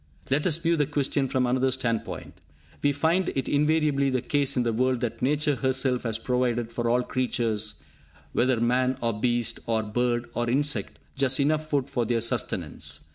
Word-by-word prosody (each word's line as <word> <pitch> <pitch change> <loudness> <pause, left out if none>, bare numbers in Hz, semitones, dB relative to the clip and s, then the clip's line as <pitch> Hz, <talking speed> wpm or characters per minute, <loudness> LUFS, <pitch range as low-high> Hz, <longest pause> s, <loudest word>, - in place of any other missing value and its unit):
Let 145 +5 +2
us 160 -3 +3
view 165 0 +1
the 145 -2 +1
question 140 -1 0
from 130 -1 0
another 130 +2 +2
standpoint. 115 -8 -3 0.4
We 145 - +3
find 160 +6 +1
it 135 - -1
invariably 150 -2 +2
the 130 -2 -1
case 140 -2 +1
in 125 - +2
the 115 -1 0
world 130 +2 +1
that 120 -3 -3
Nature 145 +1 +1
herself 130 -1 +1
has 115 -1 -1
provided 120 -1 -1
for 120 0 -1
all 125 +1 +2
creatures, 110 -5 -1 0.5
whether 125 -1 +2
man 125 +2 +1
or 115 -1 0
beast, 120 -1 0
or 110 -1 +1
bird 120 +2 0
or 120 0 -1
insect, 145 +4 0 0.2
just 135 -1 +2
enough 155 +2 +1
food 140 -3 0
for 120 -4 -1
their 115 -1 +1
sustenance. 110 -7 -2
130 Hz, 180 wpm, -26 LUFS, 120-140 Hz, 0.5 s, us